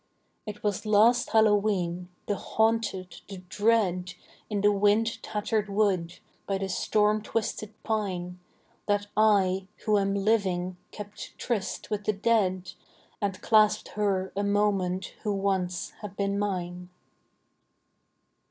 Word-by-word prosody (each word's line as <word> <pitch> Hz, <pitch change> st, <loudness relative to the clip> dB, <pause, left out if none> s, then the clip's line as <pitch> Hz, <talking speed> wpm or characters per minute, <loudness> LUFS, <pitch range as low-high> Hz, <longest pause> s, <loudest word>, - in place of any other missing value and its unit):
It 210 Hz, 0 st, -7 dB
was 205 Hz, -3 st, -1 dB
last 225 Hz, +4 st, +4 dB
Hallowe'en, 200 Hz, -5 st, +2 dB, 0.2 s
the 205 Hz, -, 0 dB
haunted, 220 Hz, -4 st, -1 dB
the 195 Hz, -, -7 dB
dread, 185 Hz, -2 st, 0 dB, 0.3 s
In 205 Hz, -2 st, -1 dB
the 205 Hz, +1 st, +5 dB
wind 210 Hz, +3 st, +2 dB
tattered 210 Hz, 0 st, -2 dB
wood, 190 Hz, -4 st, +1 dB, 0.3 s
by 195 Hz, -, 0 dB
the 195 Hz, 0 st, -3 dB
storm 210 Hz, +2 st, +2 dB
twisted 215 Hz, -1 st, -3 dB
pine, 185 Hz, -5 st, -2 dB, 0.5 s
That 205 Hz, 0 st, +1 dB
I, 195 Hz, -3 st, +3 dB, 0.2 s
who 210 Hz, -1 st, +4 dB
am 195 Hz, 0 st, 0 dB
living, 190 Hz, -4 st, 0 dB
kept 205 Hz, 0 st, -9 dB
tryst 220 Hz, -2 st, -3 dB
with 210 Hz, -1 st, -2 dB
the 215 Hz, -, +2 dB
dead, 190 Hz, -4 st, +1 dB, 0.5 s
And 200 Hz, -1 st, -2 dB
clasped 215 Hz, -2 st, +4 dB
her 195 Hz, -3 st, -1 dB
a 200 Hz, -, 0 dB
moment 200 Hz, -3 st, 0 dB
who 210 Hz, -2 st, -1 dB
once 190 Hz, -3 st, -1 dB
had 205 Hz, -2 st, -7 dB
been 200 Hz, 0 st, 0 dB
mine. 180 Hz, -3 st, -3 dB
200 Hz, 125 wpm, -27 LUFS, 185-215 Hz, 0.5 s, the